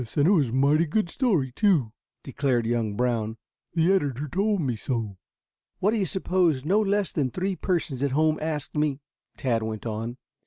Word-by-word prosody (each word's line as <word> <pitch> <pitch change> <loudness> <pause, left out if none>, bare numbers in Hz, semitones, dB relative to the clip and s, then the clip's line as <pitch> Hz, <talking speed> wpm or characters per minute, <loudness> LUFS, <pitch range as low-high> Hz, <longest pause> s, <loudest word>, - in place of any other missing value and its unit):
And 145 - +3
it - - +5
was 150 - +3
a - - -6
mighty 145 +5 +3
good 175 +1 0
story, 185 - +1
too," 155 - +2 0.3
declared 130 -3 0
young 115 -3 -1
Brown. 115 -2 -1 0.4
"The 170 +3 +4
editor 145 -6 0
told 200 +6 0
me 130 -6 -1
so." 110 -4 -3 0.6
"What 205 - +2
do 225 - 0
you 195 -3 0
suppose 175 -6 +1
no 195 +6 +3
less 205 -1 0
than 140 -5 0
three 185 +6 -2
persons 165 -9 -2
at 140 - +2
home 155 +3 +2
asked 155 -2 -3
me?" 150 -2 0 0.4
Tad 120 -4 0
went 110 0 -5
on. 115 +2 -4
145 Hz, 185 wpm, -26 LUFS, 120-180 Hz, 0.6 s, it